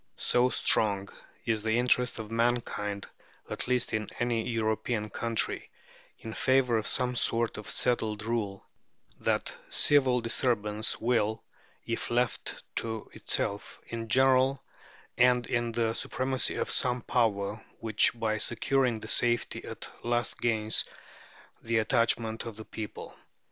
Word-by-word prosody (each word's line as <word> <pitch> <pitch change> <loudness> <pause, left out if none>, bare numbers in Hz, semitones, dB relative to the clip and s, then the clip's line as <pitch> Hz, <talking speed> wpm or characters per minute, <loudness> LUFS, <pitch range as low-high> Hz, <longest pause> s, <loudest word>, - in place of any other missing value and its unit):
So 125 +1 +2
strong 100 -5 +2 0.4
is 110 -2 0
the 110 +1 +1
interest 125 0 +3
of 110 -1 -7
mankind, 115 -4 -1 0.4
at - - -4
least 125 0 +1
in 110 -1 -1
any 120 -1 0
European 110 -1 -1
country, 115 -1 -1 0.5
in 110 - -8
favour 130 -3 +3
of 110 - -3
some 125 -1 +1
sort 115 -1 +1
of 105 - -8
settled 110 -4 0
rule, 105 -4 -2 0.5
that - - 0 0.2
civil 130 -4 +4
disturbance 110 -2 0
will, 110 -2 +1 0.4
if 115 - -3
left 120 -1 -1
to 110 -1 -3
itself, 100 0 -2
in 115 -1 -5
general 130 +2 +4 0.6
end 125 0 +5
in 120 -1 -1
the 115 -1 0
supremacy 130 +2 0
of - - -1
some 125 -1 +1
power 105 -3 0 0.2
which 110 -2 +3
by 110 -1 0
securing 120 0 +1
the - - -7
safety 120 -1 +1
at - - -7 0.2
last 120 0 -1
gains 110 -2 +2 0.8
the 115 0 0
attachment 115 0 +1
of 115 - -7
the 110 +1 -9
people. 110 -1 -7
115 Hz, 130 wpm, -29 LUFS, 110-125 Hz, 0.8 s, end